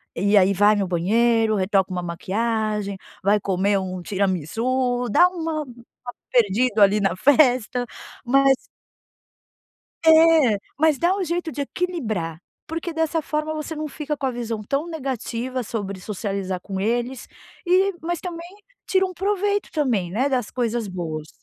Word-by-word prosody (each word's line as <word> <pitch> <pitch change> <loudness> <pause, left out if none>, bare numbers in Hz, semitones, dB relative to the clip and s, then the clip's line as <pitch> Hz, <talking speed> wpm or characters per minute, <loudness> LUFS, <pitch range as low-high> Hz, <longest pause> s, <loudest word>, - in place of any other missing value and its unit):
e 200 +4 +3
aí 195 +1 +5
vai 205 +2 +4
no 200 -2 0
banheiro, 220 +5 +2
retoca 190 -1 +1
uma 180 -1 -3
maquiagem, 210 +3 -2 0.3
vai 205 +2 +3
comer 195 +1 +1
um 185 -1 -5
tiramisu, 225 - -1
dá 350 +12 +6
uma 325 -3 -3
uma 245 -1 -12 0.2
perdido 225 -1 +2
ali 200 +1 +5
na 195 -3 +1
festa. 250 0 +3 0.4
Mas 270 +2 +4 1.5
É! 320 -8 +6 0.2
Mas 310 -2 +3
dá 350 +6 +2
um 390 - -1
jeito 340 0 -2
de 285 - -3
equilibrar. 220 - -3 0.3
Porque 330 +1 -4
dessa 320 0 0
forma 305 +1 -2
você 310 +1 -5
não 305 0 -3
fica 300 +1 -4
com 275 - -3
a - - +1
visão 230 -2 -4
tão 280 +9 -2
negativa 255 -4 -3
sobre 200 -4 -5
socializar 195 -2 -4
com 190 +1 -5
eles 240 +4 -2 0.4
e 375 +2 +3
mas 345 0 -2
também 340 -2 -6 0.4
tira 380 0 +2
um 370 - -8
proveito 405 +2 -1
também, 240 - 0
né, 245 +9 +1
das 250 -5 -1
coisas 235 -3 -2
boas. 160 -4 -5
240 Hz, 150 wpm, -23 LUFS, 200-310 Hz, 1.5 s, dá